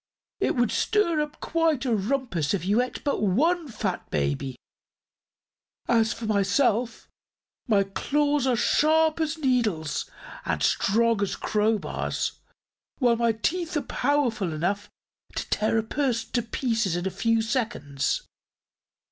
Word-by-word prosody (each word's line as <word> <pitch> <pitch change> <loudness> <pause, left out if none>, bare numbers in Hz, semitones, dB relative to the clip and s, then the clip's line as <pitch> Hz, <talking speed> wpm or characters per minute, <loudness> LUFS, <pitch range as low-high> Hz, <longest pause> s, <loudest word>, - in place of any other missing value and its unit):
"It - - +1
would 240 -3 +2
stir 340 -8 +2
up 300 0 -5
quite 325 -5 +1
a 240 -3 +2
rumpus 210 - 0
if 180 - -4
you 205 +5 +3
ate 250 - -5
but 285 - 0
one 310 - +2
fat 205 -7 -4
baby. 75 - -1 1.3
As 225 -2 +3
for 230 0 -5
myself; 220 +3 +1 0.6
my 205 -4 +4
claws 285 +7 0
are 255 - +3
sharp 315 +6 +3
as 320 0 -1
needles 215 - 0 0.3
and 80 -4 -1
strong 225 - +2
as 200 - 0
crowbars, 215 0 -1 0.7
while 240 -3 +3
my 235 0 +3
teeth 330 +9 -1
are - - +1
powerful 245 - 0
enough 195 +6 -2 0.5
to - - -3
tear 215 +1 +1
a 220 - +1
person 230 -2 -1
to 240 - +1
pieces 225 -5 -1
in 175 +1 -2
a 190 - -1
few 230 +2 +1
seconds. 220 - -1
230 Hz, 135 wpm, -26 LUFS, 200-280 Hz, 1.3 s, my